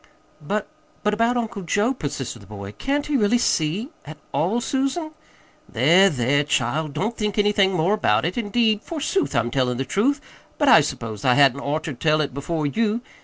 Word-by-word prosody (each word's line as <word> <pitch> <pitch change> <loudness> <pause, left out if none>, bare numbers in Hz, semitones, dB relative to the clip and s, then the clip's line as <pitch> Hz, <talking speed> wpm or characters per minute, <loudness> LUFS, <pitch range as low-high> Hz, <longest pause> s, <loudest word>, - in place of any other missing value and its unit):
"But 200 +7 -2 0.4
but 210 0 +1
about 230 +3 +1
Uncle 225 -4 -3
Joe," 205 +7 +1
persisted 145 - -5
the 100 - -16
boy. 100 -1 -8
"Can't 280 - -2
he 300 - -2
really 220 +1 +3
see 195 - 0
at 155 - -10
all, 195 +9 0
Susan?" 275 +6 -2 0.6
"There, 190 +3 +5
there, 140 0 +1
child, 150 +1 -1
don't 215 +10 -2
think 210 -2 -2
anything 205 -2 +3
more 180 +3 +1
about 115 - +1
it. 175 - -2
Indeed, 220 -1 +1
forsooth, 330 - -2
I'm 115 +1 +1
tellin' 125 -2 0
the 135 - -2
truth, 245 - +1 0.4
but 290 - +1
I 165 - +8
s'pose 115 -7 -5
I 125 -1 +4
hadn't 140 -1 +4
oughter 150 +2 -3
told 155 +4 +1
it 140 -3 -3
before 150 +3 -3
you. 220 +9 0
185 Hz, 180 wpm, -22 LUFS, 140-230 Hz, 0.6 s, I